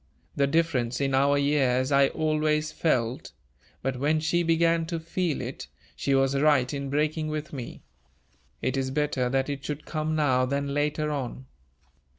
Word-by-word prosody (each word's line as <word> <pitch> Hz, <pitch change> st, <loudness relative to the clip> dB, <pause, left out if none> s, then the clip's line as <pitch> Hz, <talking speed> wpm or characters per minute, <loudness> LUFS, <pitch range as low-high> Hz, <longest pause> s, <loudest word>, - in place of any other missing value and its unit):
The 140 Hz, -, +2 dB
difference 140 Hz, -6 st, 0 dB
in 135 Hz, -1 st, 0 dB
our 140 Hz, +2 st, +3 dB
years 135 Hz, -2 st, +2 dB
I 140 Hz, 0 st, +5 dB
always 155 Hz, 0 st, 0 dB
felt; 125 Hz, -6 st, -1 dB, 0.5 s
but, 135 Hz, -1 st, -1 dB
when 150 Hz, +3 st, +2 dB
she 160 Hz, +2 st, +1 dB
began 165 Hz, 0 st, +2 dB
to 165 Hz, -1 st, -3 dB
feel 170 Hz, -1 st, -2 dB
it, -, -, -6 dB, 0.3 s
she 140 Hz, -, 0 dB
was 135 Hz, 0 st, +2 dB
right 140 Hz, -2 st, +3 dB
in 140 Hz, -1 st, -4 dB
breaking 155 Hz, +2 st, 0 dB
with 155 Hz, 0 st, -4 dB
me. 125 Hz, -4 st, -7 dB, 0.8 s
It 130 Hz, +2 st, 0 dB
is 135 Hz, -1 st, -1 dB
better 135 Hz, -3 st, 0 dB
that 135 Hz, +1 st, 0 dB
it 140 Hz, -1 st, -4 dB
should 150 Hz, 0 st, -5 dB
come 155 Hz, 0 st, -2 dB
now 130 Hz, -4 st, +2 dB
than 140 Hz, +1 st, -2 dB
later 150 Hz, +1 st, 0 dB
on." 130 Hz, -2 st, -4 dB
145 Hz, 165 wpm, -27 LUFS, 135-155 Hz, 0.8 s, I